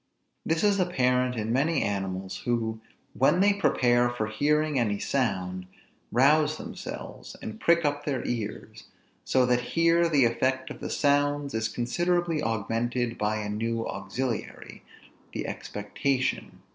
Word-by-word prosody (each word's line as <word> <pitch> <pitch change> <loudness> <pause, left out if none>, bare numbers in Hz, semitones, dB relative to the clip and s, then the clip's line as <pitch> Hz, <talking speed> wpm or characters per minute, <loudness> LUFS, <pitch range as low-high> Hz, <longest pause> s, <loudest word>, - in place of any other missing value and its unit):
This 160 +3 0
is 205 -1 +3
apparent 125 -8 +1
in 110 0 -2
many 145 +4 +2
animals, 95 -2 -3
who, 115 -2 -2 0.3
when 135 +7 +3
they 200 +1 +5
prepare 120 -11 +3
for 120 -3 -2
hearing 150 +5 +1
any 105 -4 +1
sound, 95 -8 -1 0.4
rouse 150 +5 +4
themselves, - - -8
and 110 0 -7
prick 170 -1 +3
up 145 0 0
their 135 -5 -2
ears; 110 -1 -5 0.4
so 130 -1 +3
that 125 0 +2 0.2
here 170 0 +4
the 140 -6 +4
effect 130 +3 0
of - - -8
the - - -5
sounds 145 0 +1
is 110 0 0
considerably 175 +7 0
augmented 115 +1 -1
by 105 +1 0
a 105 - -4
new 115 +2 -2
auxiliary, 125 -4 -4 0.5
the - - -3
expectation. 130 +6 -2
125 Hz, 135 wpm, -27 LUFS, 110-150 Hz, 0.5 s, they